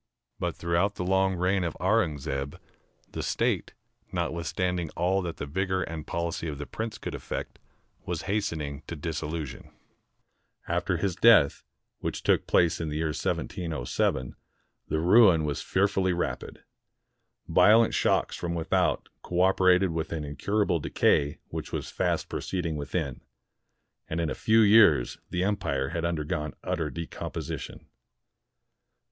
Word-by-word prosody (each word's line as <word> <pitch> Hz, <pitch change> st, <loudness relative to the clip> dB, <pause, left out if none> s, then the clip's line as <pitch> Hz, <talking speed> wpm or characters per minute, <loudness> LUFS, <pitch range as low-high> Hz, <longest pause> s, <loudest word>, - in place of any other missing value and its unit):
But -, -, -2 dB
throughout 85 Hz, +4 st, 0 dB
the -, -, -3 dB
long 95 Hz, +1 st, +2 dB
reign 90 Hz, +2 st, +1 dB
of 85 Hz, -, -3 dB
Aurungzebe, 75 Hz, -9 st, 0 dB, 0.5 s
the -, -, -4 dB
State, -, -, -1 dB, 0.4 s
notwithstanding 90 Hz, 0 st, -1 dB
all 95 Hz, +3 st, +1 dB
that 85 Hz, -2 st, -5 dB
the -, -, -4 dB
vigor 95 Hz, +5 st, -1 dB
and 80 Hz, -2 st, -6 dB
policy 85 Hz, 0 st, -2 dB
of 75 Hz, -2 st, -4 dB
the 75 Hz, -, -5 dB
prince 110 Hz, +6 st, -5 dB
could -, -, -6 dB
effect, -, -, -5 dB, 0.4 s
was 85 Hz, -2 st, -4 dB
hastening 80 Hz, -9 st, -2 dB
to 85 Hz, -, -5 dB
dissolution. 80 Hz, -1 st, -5 dB, 1.0 s
After -, -, 0 dB
his 95 Hz, -4 st, -1 dB
death, 110 Hz, -10 st, +5 dB, 0.4 s
which -, -, -4 dB
took -, -, +2 dB
place 85 Hz, -1 st, +3 dB
in 80 Hz, -, -2 dB
the 75 Hz, -, -4 dB
year 80 Hz, 0 st, 0 dB
1707, 75 Hz, -5 st, -2 dB, 0.5 s
the 80 Hz, -, 0 dB
ruin 90 Hz, -2 st, +6 dB
was 75 Hz, -1 st, -2 dB
fearfully 95 Hz, -1 st, +1 dB
rapid. 70 Hz, -7 st, -4 dB, 0.8 s
Violent 110 Hz, +2 st, +5 dB
shocks -, -, +1 dB
from 85 Hz, -1 st, -3 dB
without 80 Hz, -1 st, +1 dB
cooperated 90 Hz, 0 st, +3 dB
with 80 Hz, -1 st, -3 dB
an 80 Hz, -2 st, -3 dB
incur 100 Hz, +9 st, 0 dB
able 90 Hz, -4 st, +1 dB
decay 70 Hz, 0 st, +2 dB
which -, -, -6 dB
was -, -, -4 dB
fast -, -, 0 dB
proceeding 85 Hz, -4 st, -3 dB
within; 70 Hz, -2 st, -3 dB, 0.9 s
and 80 Hz, -, -2 dB
in 80 Hz, -2 st, 0 dB
a -, -, 0 dB
few 110 Hz, +1 st, +3 dB
years 110 Hz, +1 st, +5 dB
the 90 Hz, -, -1 dB
empire 70 Hz, -10 st, 0 dB
had 85 Hz, -, -3 dB
undergone 75 Hz, -4 st, -2 dB
utter 80 Hz, -2 st, -1 dB
decom 85 Hz, +2 st, -6 dB
position. -, -, -6 dB
85 Hz, 140 wpm, -28 LUFS, 75-95 Hz, 1.0 s, ruin